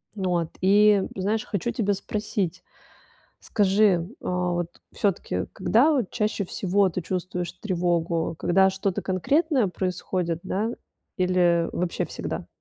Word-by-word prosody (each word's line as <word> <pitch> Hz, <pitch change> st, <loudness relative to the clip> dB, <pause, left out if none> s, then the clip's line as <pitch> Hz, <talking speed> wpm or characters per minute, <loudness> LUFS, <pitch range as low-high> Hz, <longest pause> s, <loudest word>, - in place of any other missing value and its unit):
вот. 180 Hz, -4 st, 0 dB
И, 205 Hz, +1 st, +5 dB
знаешь, 205 Hz, +3 st, -1 dB
хочу 210 Hz, +4 st, -2 dB
тебя 205 Hz, -4 st, 0 dB
спросить: 200 Hz, -3 st, -3 dB, 0.8 s
скажи, 195 Hz, -4 st, +2 dB, 0.2 s
а, 180 Hz, 0 st, 0 dB
вот, 175 Hz, 0 st, -4 dB
всё-таки, 170 Hz, -, -1 dB
когда 265 Hz, +10 st, +3 dB
от 210 Hz, -, -4 dB
чаще 210 Hz, -3 st, -1 dB
всего 195 Hz, +2 st, +1 dB
ты 180 Hz, +1 st, -3 dB
чувствуешь 180 Hz, 0 st, -3 dB
тревогу, 170 Hz, -4 st, -1 dB
когда 190 Hz, +2 st, +4 dB
что-то 190 Hz, 0 st, -2 dB
конкретное 260 Hz, -, +1 dB
происходит, 180 Hz, -2 st, -2 dB
да, 215 Hz, +4 st, -1 dB, 0.5 s
или 180 Hz, -2 st, +3 dB
вообще 175 Hz, 0 st, -1 dB
всегда? -, -, -5 dB
185 Hz, 120 wpm, -25 LUFS, 175-205 Hz, 0.8 s, И